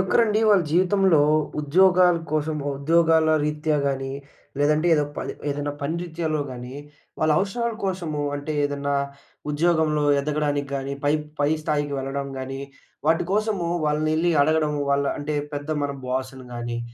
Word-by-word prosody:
ఒక్కరండి 215 +3 +2
వాళ్ళ 200 -4 +5
జీవితంలో 185 -1 +4 0.4
ఉద్యోగాల 180 +3 +4 0.2
కోసం, 155 0 0 0.2
ఉద్యోగాల 160 +2 +3 0.2
రీత్యా 150 0 0
గాని 135 -1 -2 0.5
లేదంటే 150 +3 +2
ఏదో 150 -1 +2
పలి - - -4 0.2
ఏదైనా 145 0 -3
పని 145 +4 -2
రీత్యాలో 160 -3 -2
గానీ 125 0 -8 0.5
వాళ్ళ 155 0 +3
అవసరాల 235 +4 -1
కోసము, 175 -6 -2
అంటే 145 +2 -4
ఏదన్నా 145 0 -1 0.6
ఉద్యోగంలో 155 -1 +2 0.2
ఎదగడానికి 145 -1 -1
గానీ 135 0 -4
పై 145 - +3 0.3
పై 145 - +3
స్థాయికి 145 -1 -1
వెళ్ళడం 135 +1 -3
గానీ 135 +1 -5 0.5
వాటి 165 +1 +2
కోసము 210 -4 0 0.2
వాళ్ళనెళ్లి 155 +3 +1
అడగడం. 155 0 +2 0.2
వాళ్ళ 140 0 +2
అంటే 150 +1 -3 0.2
పెద్ద 145 +1 -5
మన 145 0 -1
బాస్‌ని 130 0 -4
గానీ 120 0 -4
150 Hz, 135 wpm, -24 LUFS, 140-170 Hz, 0.6 s, వాళ్ళ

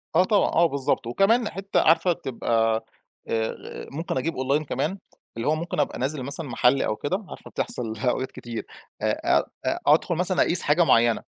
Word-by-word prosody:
آه، 180 - +6
طبعًا، 205 +1 +2
آه، 170 - +4
بالضبط. 140 -6 0
وكمان، 215 - +2
حتى 195 +1 -1
عارفة، 165 +2 +4
تبقى 115 -5 0 0.4
آآ 110 - -4
ممكن 155 0 -3
أجيب 160 +6 -1
Online، 140 +4 +1
كمان، 150 +7 -2 0.4
اللي 115 - -2
هو 155 - +3
ممكن 165 0 -4
أبقى 145 - 0
نازل 135 +1 -2
مثلًا 140 +3 -5
محل، 125 +3 +3
أو 110 - 0
كده، 185 - -3
عارفة، - - -10
بتحصل 115 -3 -3
أوقات 130 +2 -1
كتير، 115 -2 -7 0.4
آآ، - - +1 0.4
أدخل 160 +4 +4
مثلًا 180 +2 +1
أقيس 175 - +3
حاجة 150 +4 +3
مُعيّنة، 115 -6 +4
145 Hz, 170 wpm, -25 LUFS, 125-170 Hz, 0.4 s, آه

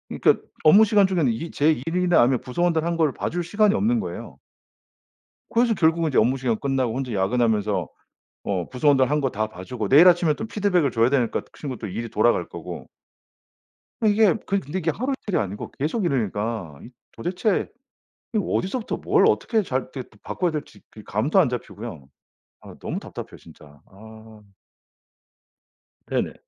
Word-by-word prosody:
그러니까 - - +3 0.2
업무 200 +8 +7
시간 205 -2 +4
중에는 170 -9 +1
이 165 +9 -6
제 150 +2 +3
일이나 175 -1 +3
아니면 125 +1 +3
부서원들 165 +4 0
한 170 0 0
걸 160 -3 +2
봐 - - -3
줄 175 +1 -3
시간이 205 +4 +2
없는 230 +2 +1
거예요. 215 - -7 1.1
그래서 235 0 +2
결국은 165 -3 +2
제 - - 0
업무 125 +5 +3
시간 125 -4 -1
끝나고 130 -4 -1
혼자 130 -4 -3
야근하면서 105 -2 +1 0.6
어 95 -4 -2
부서원들 135 0 +2
한 150 0 +2
거 135 - 0
다 110 0 -2
봐 95 -3 -10
주고 110 0 -4
내일 150 +6 +7
아침에 175 -3 +5
또 220 - -5
피드백을 195 -9 +1
줘야 115 +2 +3
되니까 125 -5 +1
그 - - -23
친구 135 -5 -5
또 - - -6
일이 115 +5 -5
돌아갈 110 -5 +1
거고. - - -8 1.2
이게 210 -1 +4
그 200 - 0
근데 165 +4 -5
이게 165 -1 0
하루이틀이 255 - -2
아니고 100 -1 -4
계속 160 - -2
이러니까 105 - -2
이 - - -11 0.2
도대체 180 - -1 0.6
이 215 - +2
어디서부터 205 +6 -2
뭘 - - +3
어떻게 225 -2 +1
잘 130 -5 -1
이렇게 130 - -4 0.2
바꿔야 175 -3 -1
될지 150 -2 -7 0.2
이 105 - -10
감도 135 - +1
안 160 -8 +4
잡히고요. 110 - -7 0.5
아 - - -12
너무 - - -4
답답해요. - - -9
진짜 75 -1 -17
아. 110 +2 -15 1.7
네네. - - -1
140 Hz, 355 characters per minute, -23 LUFS, 110-180 Hz, 1.7 s, 업무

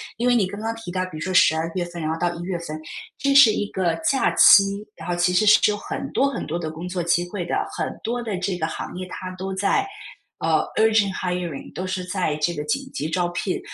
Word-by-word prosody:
因 240 +2 +1
为 - - +4
你 220 -6 +3
刚 205 +2 -7
刚 225 +1 -2
提 225 -5 -9
到， 185 0 0
比 180 - -9
如 - - -7
说 185 +4 -3
12 160 -2 +4
月 180 - 0
份 175 -1 -7
然 155 - -2
后 160 - -1
到 175 -1 +1
1 170 - -7
月 180 0 -3
份， 155 -2 -6 0.4
这 275 0 +1
是 275 -6 +9
一 205 -1 -2
个 180 -3 0 0.2
假 275 - +2
期， 200 +1 +6
然 - - -10
后 - - +1
其 175 +1 +2
实 215 +4 +3
是 210 - +6
有 - - -1
很 275 +5 -5
多 275 +1 +3
很 275 - -4
多 165 - -2
的 160 -2 -4
工 165 +3 -7
作 180 0 -3
机 175 +1 +1
会 185 -2 -4
的， - - -2 0.2
很 - - -2
多 240 +2 -2
的 215 -5 -3
这 185 0 -2
个 160 - -1
行 - - -6
业 185 0 -5
它 185 0 -6
都 190 +1 -4
在， 205 - +1 0.5
呃， - - +2 0.2
urgent 220 -2 +4
hiring， 180 -5 -4
都 185 - -4
是 185 0 -3
在 180 -4 -1
这 155 +3 0
个 150 - -4
紧 275 - -1
急 150 - -3
招 175 +2 0
聘。 175 +2 -2
185 Hz, 310 characters per minute, -23 LUFS, 175-205 Hz, 0.5 s, 是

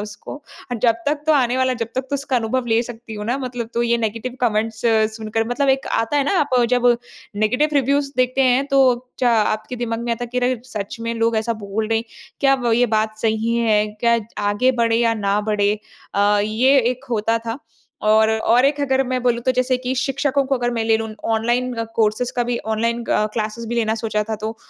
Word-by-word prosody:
उसको 205 0 -8 0.4
और 235 - -2
जब 235 -2 +4
तक 295 0 0
तो 315 - +5
आने 255 -4 +2
वाला, 260 0 +2
जब 230 -1 -4
तक 260 - +1
तो - - 0
उसका 280 -2 -1
अनुभव 240 +2 -1
ले 225 0 +2
सकती 235 -2 -9
हूँ 210 0 -5
ना 245 +3 0
मतलब, 245 -3 -5
तो 235 - +1
ये 235 0 +2
नेगेटिव 230 +3 -3
कमेंट्स 225 -1 0 0.4
सुनकर 225 +1 -2
मतलब 275 +3 0
एक 270 0 +2
आता 225 +6 -1
है 280 - +2
ना 395 - 0
आप 285 -3 0 0.2
जब 245 -1 +2 0.5
नेगेटिव 250 +8 +2
रिव्यूज़ 280 +1 +1
देखते 255 +1 +2
हैं 260 +2 +3
तो 275 -1 +3 0.4
च 255 - -1
आपके 220 0 +1
दिमाग 230 -1 -3
में 235 - 0
आता 245 +1 -3
है - - -9
कि 250 - 0
अगर 250 -1 0
सच 215 -5 -6
में 230 0 -3
लोग 230 0 +1
ऐसा 225 +2 0
बोल 215 +2 -2
रहे 225 0 +2
हैं, 230 - -5 0.4
क्या 275 -1 +4
ब 240 -3 0
ये 245 +1 +3
बात 215 0 -1
सही 225 +1 0
है? 215 -2 +2
क्या 235 0 +3 0.3
आगे 250 +6 +2
बढ़े 230 0 +2
या 230 -1 +2
ना 205 -1 0
बढ़े 205 0 +1 0.4
अ, 205 +1 +3
ये 250 +6 +3
एक 250 +3 -2
होता 225 0 +1
था 230 +4 -3 0.4
और 220 +1 +4
और 225 +3 +3
एक 285 +1 +2
अगर 265 -1 +2
मैं 255 -1 -2
बोलूँ 240 -1 +1
तो 255 - +4
जैसे 255 0 +2
कि 255 +1 -3
शिक्षकों 275 +1 0
को 275 - +1
अगर 245 0 -1
मैं 235 -2 -1
ले 225 0 +3
लूँ, 220 0 -4 0.2
ऑनलाइन 240 +3 0 0.2
कोर्सेज़ 220 +2 +1
का 245 - +2
भी, 240 0 -1
ऑनलाइन 230 +2 -2
अ, 215 - +1
क्लासेज़ 220 +1 -3
भी 240 - -2
लेना 220 -2 +1
सोचा 215 -1 -1
था, 220 - -2
तो 220 +2 -5
235 Hz, 225 wpm, -20 LUFS, 220-255 Hz, 0.5 s, तो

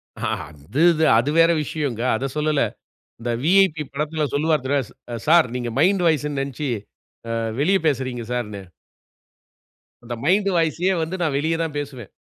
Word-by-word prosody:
அ, - - -11 0.3
அது 75 - -4
இது 160 0 +2
அது 120 +5 +1
வேற 165 +1 +6
விஷயங்க. 140 -7 -3 0.2
அதச் 135 +2 -4
சொல்லல. 150 -1 +1 0.6
இந்த 120 +1 -3
விஐபி 175 -2 +4
படத்தில் 150 +1 -2
சொல்லுவாரு 155 -1 +1
தனுஷ் 140 -4 0 0.2
அ - - -2
சார் 165 -2 +6
நீங்க 120 -1 -2
மைண்ட் 185 +4 +3
வாய்ஸ்ன்னு 150 -3 +1
நெனைச்சு 140 +1 -4 0.6
அ - - -1 0.3
வெளிய 185 +7 +3
பேசுறீங்க 130 -4 -1
சார்ன்னு. 105 -5 -4 1.4
அந்த 120 0 -6
மைண்ட் 195 +4 +3
வாய்ஸயே 170 +3 +1
வந்து 165 +4 -4
நான் 155 -5 0
வெளிய 160 +3 0
தான் 155 -2 -4
பேசுவேன். 135 -7 -6
150 Hz, 150 wpm, -22 LUFS, 130-165 Hz, 1.4 s, வேற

